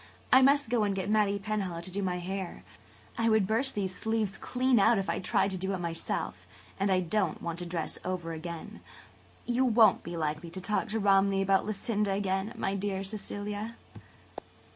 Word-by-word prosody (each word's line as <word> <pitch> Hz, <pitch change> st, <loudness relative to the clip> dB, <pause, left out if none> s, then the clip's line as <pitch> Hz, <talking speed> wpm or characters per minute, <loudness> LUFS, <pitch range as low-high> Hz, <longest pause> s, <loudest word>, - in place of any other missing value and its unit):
I 260 Hz, -, +8 dB
must 275 Hz, -2 st, +4 dB
go 235 Hz, -3 st, +3 dB
and 200 Hz, -1 st, 0 dB
get 190 Hz, +1 st, -2 dB
Mattie 210 Hz, -2 st, +3 dB
Penhallow 195 Hz, -4 st, -3 dB
to 185 Hz, +2 st, -6 dB
do 200 Hz, +2 st, -2 dB
my 180 Hz, -2 st, -1 dB
hair. 185 Hz, +1 st, -5 dB, 0.6 s
I 230 Hz, 0 st, +3 dB
would 220 Hz, -3 st, +4 dB
burst 230 Hz, +7 st, +1 dB
these 190 Hz, -3 st, -1 dB
sleeves 220 Hz, 0 st, -1 dB
clean 255 Hz, -1 st, +2 dB
out 225 Hz, +3 st, +5 dB
if 195 Hz, -, -1 dB
I -, -, -2 dB
tried 195 Hz, +1 st, +1 dB
to 185 Hz, -, -3 dB
do 190 Hz, +2 st, -1 dB
it -, -, -3 dB
myself 170 Hz, -2 st, -3 dB, 0.3 s
and 195 Hz, +1 st, +1 dB
I 185 Hz, -1 st, +3 dB
don't 195 Hz, +4 st, 0 dB
want 170 Hz, 0 st, -4 dB
to 175 Hz, -, -5 dB
dress 170 Hz, -2 st, -3 dB
over 175 Hz, -2 st, -3 dB
again. 165 Hz, 0 st, -7 dB, 0.7 s
You 245 Hz, +2 st, +1 dB
won't 230 Hz, -3 st, +5 dB
be 170 Hz, 0 st, -6 dB
likely 155 Hz, +1 st, -2 dB
to 185 Hz, -, -6 dB
talk 210 Hz, +3 st, -1 dB
to 220 Hz, +1 st, -1 dB
Romney 195 Hz, -1 st, +3 dB
about 195 Hz, +1 st, +2 dB
Lucinda 210 Hz, -1 st, -1 dB
again, 195 Hz, +1 st, -1 dB
my 195 Hz, -3 st, -1 dB
dear 195 Hz, -1 st, -2 dB
Cecilia?" 210 Hz, +2 st, -4 dB
195 Hz, 190 wpm, -30 LUFS, 185-215 Hz, 0.7 s, I